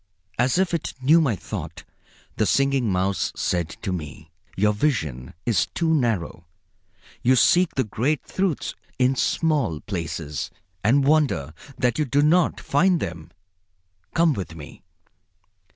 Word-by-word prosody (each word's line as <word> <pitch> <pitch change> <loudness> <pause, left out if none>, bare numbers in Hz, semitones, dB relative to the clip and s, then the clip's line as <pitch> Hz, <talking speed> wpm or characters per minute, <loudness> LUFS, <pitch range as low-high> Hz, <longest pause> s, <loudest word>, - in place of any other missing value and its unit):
As 125 +3 +2
if 185 -2 +1
it 170 - -2
knew 155 +6 +5
my 130 -9 +1
thought, - - -7 0.5
the 110 - +2
Singing 135 -5 +2
Mouse 95 +1 0
said 85 -2 -1
to 100 - -2
me: 80 -2 -7 0.3
"Your 105 +2 +3
vision 80 - -2
is 115 -3 +2
too 165 -1 +1
narrow. 110 - -1 0.7
You 130 +2 +4
seek 175 +6 +4
the 130 - +2
great 125 +7 -1
truths 185 -6 -2 0.2
in 130 +1 +3
small 140 - 0
places, 80 -6 -4 0.3
and 135 +7 +3
wonder 140 - +2 0.2
that 125 +2 +1
you 150 - +2
do 140 +2 +2
not 165 +2 +3
find 175 +5 +2
them. 85 - -6 0.9
Come 165 -2 +4
with 90 -8 -6
me." 75 +1 -11
125 Hz, 135 wpm, -24 LUFS, 90-150 Hz, 0.9 s, knew